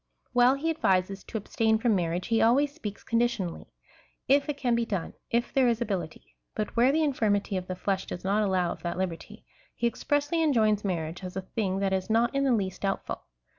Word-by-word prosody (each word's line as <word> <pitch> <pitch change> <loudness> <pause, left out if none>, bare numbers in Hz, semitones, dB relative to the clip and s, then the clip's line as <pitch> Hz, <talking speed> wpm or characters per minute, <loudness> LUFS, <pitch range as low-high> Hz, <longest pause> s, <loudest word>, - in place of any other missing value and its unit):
While 245 +2 +5
he 320 +4 -1
advises 195 - +1
to - - -4
ab 205 - -8
stain 220 -1 +2
from 225 0 +2
marriage, 175 -1 -1
he 225 -1 +3
always 280 +5 +3
speaks 210 -9 -7
conditionally 230 -7 -1 0.3
— - - -37
if 285 +1 -6
it 290 - -2
can 245 -4 +1
he 235 - +1
done, 195 -7 -3 0.2
if 235 +1 0
there 265 -2 +4
is 230 -2 +2
ability; 170 - -4 0.2
but 215 -1 -3
where 245 +3 +5
the 315 +2 +2
infirmity 210 -8 +1
of 185 -1 -3
the 185 - -3
flesh 190 +1 -2
does 175 - -6
not 200 +3 +2
allow 185 -4 +1
of - - -7
that 175 0 -3
liberty, 185 -3 -5 0.3
he - - -2
expressly 290 +7 0
enjoins 220 -9 +3
marriage 170 -2 -3
as 180 0 -6
a 190 - -3
thing 190 -1 -2
that 195 -1 +1
is 190 +1 -1
not 230 +3 +2
in 275 0 +1
the 265 - +3
least 195 -5 -1
doubtful. 195 -1 -3
215 Hz, 215 wpm, -28 LUFS, 185-245 Hz, 0.3 s, While